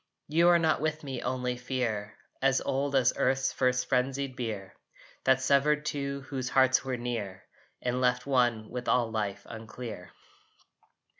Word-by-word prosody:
You 165 +3 +4
are 175 - +7
not 160 -3 +2
with 155 0 -1
me 135 -3 -5
only 125 -1 -1
fear, 120 -4 -3 0.3
As 135 -1 +3
old 140 +1 -1
as 130 -3 +4
earth's 130 0 +1
first 125 -1 +1
frenzied 130 +1 0
bier 110 -6 -5 0.5
That 130 0 +4
severed 145 +2 +3
two 140 -2 -3
whose 130 -1 -4
hearts 130 0 +4
were 130 -2 -2
near, 115 -6 -4 0.4
And 125 +1 0
left 125 0 +2
one 120 -5 +1
with 125 -1 -5
all 120 -3 +2
Life 100 -2 -3
unclear. 115 -3 -8
125 Hz, 150 wpm, -29 LUFS, 120-135 Hz, 0.5 s, are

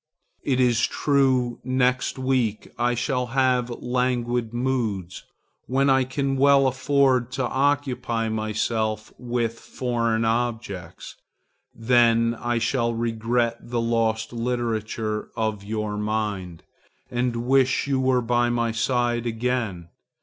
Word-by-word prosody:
It 130 -2 0
is 120 -2 +3
true, 130 -4 +1
next 130 0 +1
week 130 -5 -1
I 120 +1 +2
shall 125 +1 -1
have 125 -2 +2
languid 120 -1 -1
moods, 120 -7 -2 0.4
when 135 +2 +2
I 130 -1 +3
can 135 +1 -1
well 140 0 +5
afford 130 -1 +2
to 130 -1 -1
occupy 130 -4 0
myself 110 0 -2
with 120 -2 -2
foreign 115 -2 -1
objects; 110 -7 -3 0.6
then 115 0 +3
I 120 0 0
shall 115 +1 0
regret 115 +1 0
the 120 0 -3
lost 115 -1 0
literature 115 -2 -2
of 110 -3 -2
your 105 0 -3
mind, 105 -5 -3 0.5
and 120 -1 -1
wish 130 0 +3
you 140 -2 0
were 130 -1 +2
by 120 +1 +2
my 120 -1 0
side 120 0 0
again. 115 -7 -2
120 Hz, 115 wpm, -24 LUFS, 115-130 Hz, 0.6 s, well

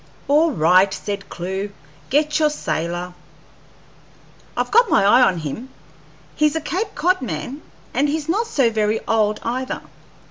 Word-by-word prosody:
"All 305 +4 +4
right," 185 +4 +4
said 200 -1 -5
Clewe; 190 +3 -4 0.4
"get 300 +3 +2
your 305 -1 +4
sailor." 175 - -3 1.4
"I've - - -1
got 470 +1 +5
my - - +4
eye 240 +6 +6
on 190 -8 +4
him; 165 - -6 0.7
he's 300 0 +2
a - - +1
Cape 385 +7 -3
Cod 365 +1 +1
man, 245 - -5 0.3
and 285 +3 +2
he's 305 0 -2
not 420 +8 0
so 270 - +2
very 215 0 +1
old 215 -1 +1
either. 255 +3 -3
245 Hz, 145 wpm, -21 LUFS, 190-305 Hz, 1.4 s, eye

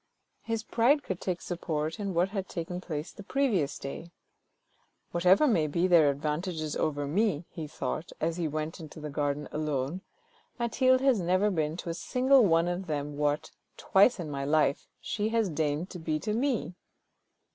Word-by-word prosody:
His 225 -1 -3
pride 265 +7 +3
could 185 -2 -4
take 180 -2 -2
support 160 0 -3
in 200 -3 -3
what 175 +3 +3
had 195 -2 -4
taken 175 +1 -4
place 155 -3 -5
the - - -11
previous 205 - 0
day. 140 +5 -7 0.5
" - - -43
Whatever 180 - +4
may 185 - +3
be 170 +4 +1
their 170 -5 +6
advantages 155 +2 -2
over 145 -2 -1
me," 175 +1 0
he 160 -3 -6
thought, 145 +4 -4
as 165 +1 -1
he 170 -2 0
went 155 +3 -4
into 155 -1 -10
the 150 -1 -6
garden 145 0 -1
alone, 150 +2 -2 0.3
" - - -35
Mathilde 255 +2 +3
has 265 -5 +4
never 185 +4 +2
been 155 -2 -1
to 175 - -5
a - - -1
single 260 +7 +3
one 165 -3 +3
of 175 +1 -3
them 145 -1 -3
what, 145 0 0 0.3
twice 200 +4 +4
in 160 -4 -4
my 140 -1 -3
life, 150 0 +2
she 210 0 -2
has 225 -3 +1
deigned 155 +3 -1
to 180 - -7
be 155 -1 -1
to 210 - -2
me 240 -5 0
170 Hz, 180 wpm, -29 LUFS, 150-200 Hz, 0.5 s, their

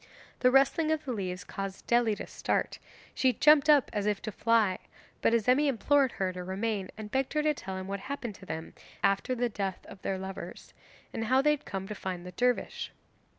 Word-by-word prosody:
The 250 - +5
rustling 275 +5 +4
of 315 -1 0
the 255 - -2
leaves 185 -3 -4
caused 195 -1 -6
Dely 235 -3 +3
to - - -5
start; - - -2 0.3
she 260 -1 +2
jumped 300 +4 +5
up 290 -3 +5
as 205 -1 -1
if 210 -1 +1
to 215 - -3
fly, 215 -3 +2 0.4
but - - +3
Azemi 250 +6 +3
implored 275 +1 +3
her 185 -1 -1
to 180 0 -6
remain 195 +1 -2
and 215 -1 -7
begged 265 0 0
her 300 -1 +1
to 305 0 +3
tell 190 -9 -6
him 190 - -5
what 200 0 -3
happened 245 -1 -5
to - - -10
them 160 0 -5 0.3
after 200 +6 +2
the 245 0 +1
death 200 -4 -4
of 190 - -12
their 190 - -2
lovers, 190 +1 -8 0.4
and 225 - -2
how 260 +4 +4
they 300 - +5
had 300 - -2
come 195 -1 -4
to 210 - -4
find 185 -3 -5
the 180 - -7
dervish. 245 +4 -1
220 Hz, 210 wpm, -30 LUFS, 195-265 Hz, 0.4 s, The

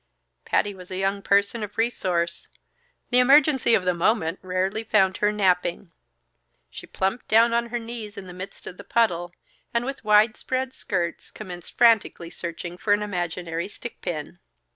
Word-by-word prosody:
Patty 205 - +1
was 185 -2 -12
a 185 - -5
young 195 +1 0
person 200 +3 +2
of 205 0 -6
resource; 180 -7 -1 0.6
the 250 - +5
emergency 270 -2 +5
of 185 - 0
the 180 - +2
moment 175 -1 +1
rarely 185 +4 -1
found 195 -4 +2
her 210 0 +2
napping. 180 -3 0 0.8
She - - -10
plumped 195 +5 -2
down 230 +2 +5
on 235 0 +1
her 240 +1 -3
knees 230 -2 -7
in 195 - -7
the 180 - -10
midst 185 +2 -9
of 180 - -8
the - - -10
puddle, 175 -7 +1 0.4
and 235 +1 +1
with 270 -2 -5
widespread 225 +5 +2
skirts, 175 -3 -3
commenced 180 -5 -10
frantically 220 -7 +3
searching 175 +1 -6
for 205 - +2
an 205 0 +1
imaginary 175 -3 -3
stick 235 +3 -9
pin. 150 - -5
200 Hz, 165 wpm, -24 LUFS, 180-230 Hz, 0.8 s, the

